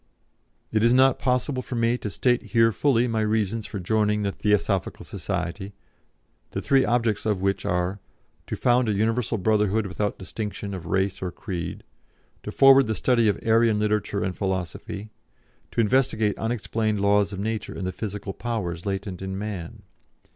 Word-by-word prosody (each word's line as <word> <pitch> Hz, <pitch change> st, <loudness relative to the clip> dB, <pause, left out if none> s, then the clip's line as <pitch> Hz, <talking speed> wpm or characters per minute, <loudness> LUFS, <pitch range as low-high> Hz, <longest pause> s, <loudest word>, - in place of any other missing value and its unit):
"It 110 Hz, 0 st, +1 dB
is 120 Hz, +1 st, +5 dB
not 130 Hz, 0 st, +5 dB
possible 130 Hz, +1 st, 0 dB
for 125 Hz, -, -6 dB
me 115 Hz, 0 st, +2 dB
here 120 Hz, -, +1 dB
to 105 Hz, -, -4 dB
state 120 Hz, +5 st, 0 dB, 0.3 s
fully 125 Hz, -4 st, +2 dB
my 110 Hz, -2 st, 0 dB
reasons 110 Hz, 0 st, 0 dB
for 100 Hz, -, -5 dB
joining 105 Hz, +2 st, +1 dB
the 100 Hz, -, 0 dB
Theosophical 105 Hz, -2 st, 0 dB
Society, 95 Hz, +1 st, -4 dB, 0.8 s
the -, -, -1 dB
three 135 Hz, -1 st, +4 dB
objects 115 Hz, -3 st, +1 dB
of 105 Hz, -3 st, +1 dB
which 95 Hz, 0 st, -1 dB
are: 90 Hz, +3 st, -1 dB, 0.5 s
To -, -, -3 dB
found 120 Hz, -1 st, +2 dB
a -, -, +2 dB
Universal 110 Hz, +2 st, 0 dB
Brotherhood 105 Hz, +1 st, +2 dB
without 100 Hz, +2 st, -2 dB
distinction 100 Hz, +1 st, -5 dB
of 90 Hz, -3 st, -6 dB
race 95 Hz, +1 st, 0 dB
or 90 Hz, -, -2 dB
creed; 85 Hz, -2 st, -5 dB, 0.6 s
to -, -, -6 dB
forward 135 Hz, -1 st, +6 dB
the 110 Hz, -, -1 dB
study 115 Hz, +2 st, +2 dB
of 105 Hz, -, +2 dB
Aryan 115 Hz, -1 st, +4 dB
literature 105 Hz, -1 st, 0 dB
and 95 Hz, -1 st, -2 dB
philosophy; 95 Hz, +2 st, -4 dB, 0.6 s
to -, -, +1 dB
investigate 110 Hz, -3 st, +2 dB
unexplained 110 Hz, -2 st, -1 dB
laws 100 Hz, 0 st, +3 dB
of 95 Hz, -, -6 dB
nature 110 Hz, +1 st, -3 dB
and 95 Hz, -, -4 dB
the 95 Hz, -, -1 dB
physical 100 Hz, -1 st, -5 dB
powers 100 Hz, -7 st, -4 dB
latent 95 Hz, -2 st, -3 dB
in 95 Hz, 0 st, -4 dB
man. 100 Hz, -5 st, -6 dB
105 Hz, 165 wpm, -25 LUFS, 95-115 Hz, 0.8 s, forward